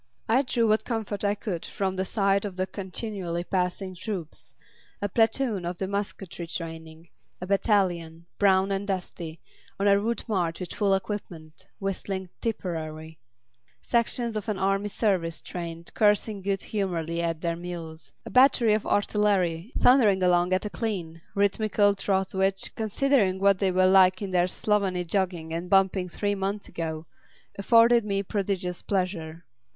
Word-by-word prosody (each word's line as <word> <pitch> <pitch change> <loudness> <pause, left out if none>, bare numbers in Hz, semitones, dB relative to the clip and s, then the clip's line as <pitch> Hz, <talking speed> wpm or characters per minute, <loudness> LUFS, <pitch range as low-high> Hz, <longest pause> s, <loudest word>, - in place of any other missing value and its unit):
I 235 +4 +4
drew 245 -4 +1
what 215 0 +3
comfort 220 -4 -3
I 205 0 +2
could 195 -5 -4
from 190 -2 -2
the 190 0 -1
sight 195 0 +1
of 200 -3 -5
the 185 0 0
continually 190 -3 -5
passing 185 +1 -1
troops; 180 -3 -6 0.4
a 205 - -1
platoon 225 -1 +1
off 175 +1 -4
to 190 - -2
musketry 195 -3 -4
training; 165 -1 -7 0.3
a 180 - -5
battalion, 180 -5 +1
brown 195 -1 +4
and 195 +1 -2
dusty, 175 -4 -4 0.4
on 200 - +2
a 200 0 +5
route 230 +3 -2
march 175 -6 -1
with 180 -2 -6
full 200 -2 +2
equipment, 180 -5 -6
whistling 195 -1 -4
"Tipperary"; 160 -7 -4 0.6
sections 235 -1 0
of 215 +1 -3
an 210 - -1
Army 195 +2 +1
Service 185 -7 0
train 170 -1 -7
cursing 210 -1 +2
good 195 0 -1
humouredly 170 -5 -2
at 165 -1 -2
their 170 -1 -1
mules; 165 -4 -8
a - - -7
battery 250 -4 +5
of 215 - -1
artillery 200 -3 +1
thundering 215 -7 +5
along 180 0 +3
at 185 +2 +1
a - - -2
clean, 175 -7 -4
rhythmical 205 0 +2
trot 195 -1 -1
which, 195 0 0
considering 220 -2 +1
what 195 -1 +4
they 195 - +2
were 185 0 +3
like 185 -1 +6
in 200 -2 -4
their 180 -1 +3
slovenly 190 -2 0
jogging 175 -3 -1
and 170 +2 -4
bumping 190 -1 +3
three 205 +3 -1
months 200 +1 -3
ago, 160 -1 -4 0.5
afforded 230 +3 +5
me 200 -1 -1
prodigious 190 -3 -2
pleasure. 175 -4 -3
190 Hz, 155 wpm, -26 LUFS, 175-205 Hz, 0.6 s, like